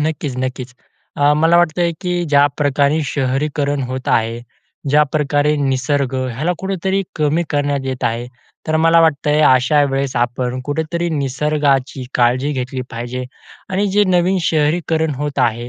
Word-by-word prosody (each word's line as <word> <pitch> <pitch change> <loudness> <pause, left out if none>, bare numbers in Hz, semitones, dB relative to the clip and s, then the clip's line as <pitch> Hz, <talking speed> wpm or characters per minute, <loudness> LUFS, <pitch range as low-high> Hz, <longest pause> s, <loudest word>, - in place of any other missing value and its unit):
नक्कीच, 150 -3 -2
नक्कीच. 130 0 -6 0.4
अ, 145 0 +4
मला 165 +2 +4
वाटतंय 175 0 +2
की 180 -1 -2 0.2
ज्या 145 0 +5
प्रकारे 145 +1 +2
शहरीकरण 140 +1 -1
होत 130 0 -5
आहे, 115 +1 +1 0.5
ज्याप्रकारे 150 0 +2
निसर्ग, 135 0 0 0.2
ह्याला 155 +9 -1
कुठेतरी 190 0 -1
कमी 155 +2 +1
करण्यात 145 -1 0
येत 130 -1 -4
आहे. 115 +1 -1 0.4
तर 155 - +1
मला 165 +1 +4
वाटतंय 150 -1 +2
अशा 130 +3 +4
वेळेस, 135 0 -2
आपण 120 +1 -1
कुठेतरी 160 +4 -2
निसर्गाची 140 -2 0
काळजी 125 +3 +2
घेतली 130 0 -4
पाहिजे 120 +2 -5 0.5
आणि 200 +2 +1
जे 205 +1 +3
नवीन 185 0 +2
शहरीकरण 160 0 0
होत 145 +1 -4
आहे, 120 -1 0
145 Hz, 140 wpm, -18 LUFS, 130-160 Hz, 0.5 s, ज्या